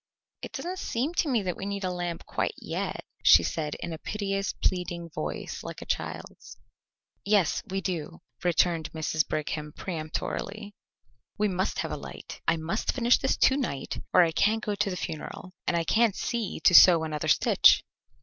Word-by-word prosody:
"It - - -8
doesn't 365 +2 -4
seem 265 +8 -2
to 330 - +1
me 235 -6 +1
that 180 -2 -2
we 195 - -5
need 200 0 -3
a 185 - -1
lamp 175 -1 -4
quite - - -2
yet," - - -4 0.2
she 85 +1 +7
said 150 - -2
in 170 - -5
a 160 - -7
piteous, 195 -2 -2
pleading 175 -2 -2
voice 75 - -5
like - - -7
a - - -9
child's. - - -5 0.7
"Yes, 200 -6 +2
we 195 +1 -2
do," 165 - -4 0.2
returned 170 -2 +1
Mrs. 155 0 0
Brigham 150 0 -3
peremptorily. 190 +6 -5 0.6
"We 210 0 +2
must 190 +2 -1
have - - -4
a - - -3
light. - - -9
I 165 - +3
must 165 +7 -2
finish 240 -1 +3
this 265 - 0
to 265 - +4
night 140 - -3
or 180 - +7
I 165 - +1
can't 215 +6 +2
go 210 - 0
to 205 0 0
the 180 - -4
funeral, 180 +3 -6
and 170 - +2
I 165 - +1
can't 220 +3 +3
see 235 -4 -3
to 170 - +5
sew 170 -2 +9
another 155 -1 -3
stitch." 145 - +5
180 Hz, 180 wpm, -27 LUFS, 160-210 Hz, 0.7 s, sew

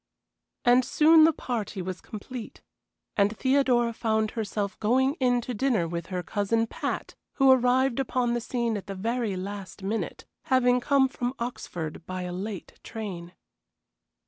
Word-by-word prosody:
And 245 +1 +6
soon 310 +4 +6
the 325 - +5
party 235 -9 -4
was 185 0 -5
complete, 225 +2 -8 0.5
and 205 +1 +2
Theodora 260 -3 +2
found 220 -1 0
herself 210 -2 -3
going 260 +5 +3
in 245 -2 +3
to 250 - -5
dinner 225 -7 +1
with 170 +1 -4
her 180 -2 -3
cousin 210 +5 0
Pat, - - -4 0.2
who 270 -1 +5
arrived 255 0 +3
upon 250 -2 0
the 240 - -1
scene 235 -2 -1
at 200 - -8
the 195 - -5
very 225 +1 -1
last 195 +1 -7
minute, 215 +3 -3 0.2
having 250 -1 +3
come 270 +1 +3
from 250 -1 -3
Oxford 175 -10 -5
by 185 0 -4
a 180 0 -4
late 195 +1 -6
train. 185 -6 -7
230 Hz, 150 wpm, -27 LUFS, 200-250 Hz, 0.5 s, And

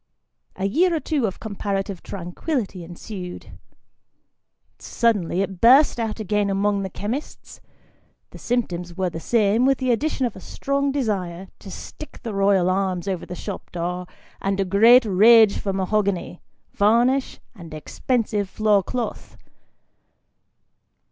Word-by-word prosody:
A 190 - -3
year 335 - +2
or - - 0
two 290 -7 0
of 190 - -6
comparative 200 -3 -3
tranquillity 195 - -4
ensued. 180 +1 -9 1.2
Suddenly 200 -6 0
it 190 -2 -7
burst 260 +3 +6
out 225 -1 -3
again 210 -1 0
amongst 200 +1 +1
the 190 - -4
chemists; 225 +10 -6 0.7
the - - -12
symptoms 180 -8 -2
were 185 -2 -1
the 165 - -6
same, 220 +3 +2
with 270 0 +3
the 255 -2 0
addition 270 +2 0
of 235 - -3
a - - -9
strong 280 +7 -2
desire 195 -9 -2
to 195 - -11
stick 305 +9 -10
the 225 - -4
royal 195 -2 +3
arms 185 -1 -1
over 185 -3 -3
the 180 - -6
shop 200 +2 -7
door, 180 +1 -4 0.3
and 195 0 -1
a 195 - +1
great 225 +6 +6
rage 215 +2 +6
for 195 - -2
mahogany, 195 -2 -1 0.3
varnish, 240 +6 +2
and 170 -7 -12
expensive 205 - -2
floor 210 -1 +2
cloth. 240 +5 -5
200 Hz, 135 wpm, -23 LUFS, 185-235 Hz, 1.2 s, burst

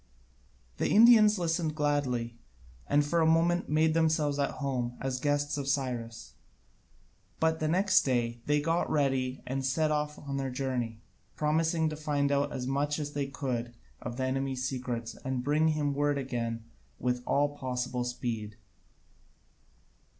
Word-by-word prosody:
The - - 0
Indians 215 -1 +7
listened 165 -2 -1
gladly, 130 -6 -1 0.5
and 145 0 +3
for 170 +3 +1
the 160 - +4
moment 170 +2 +2
made 155 +1 +3
themselves 155 -3 +1
at 140 - +1
home 125 -4 -2
as 130 -1 -2
the - - -15
guests 145 0 +1
of 140 - -4
Cyrus: 120 - -3 1.1
but 160 0 +2
the 155 - 0
next 185 +5 +4
day 120 -3 -1
they 150 0 +3
got 165 +3 0
ready 135 -3 0
and 135 +1 -2
set 155 +4 +1
off 150 0 -1
on 140 -1 -5
their 135 -1 -2
journey, 125 -4 -3 0.3
promising 160 +1 +1
to 155 - -5
find 145 -2 0
out 140 0 +1
as 125 - -4
much 145 +2 0
as 145 -1 -4
they 140 -1 -1
could 120 -4 -4 0.3
of 120 0 -6
the 130 - -1
enemy's 130 0 -1
secrets 120 -3 -4
and 130 -1 -2
bring 150 +3 +2
him 150 -2 +1
word 145 0 +1
again 115 -4 -3 0.3
with 125 0 -1
all 145 +1 +2
possible 125 -2 -2
speed. 115 -4 -4
140 Hz, 155 wpm, -30 LUFS, 125-155 Hz, 1.1 s, Indians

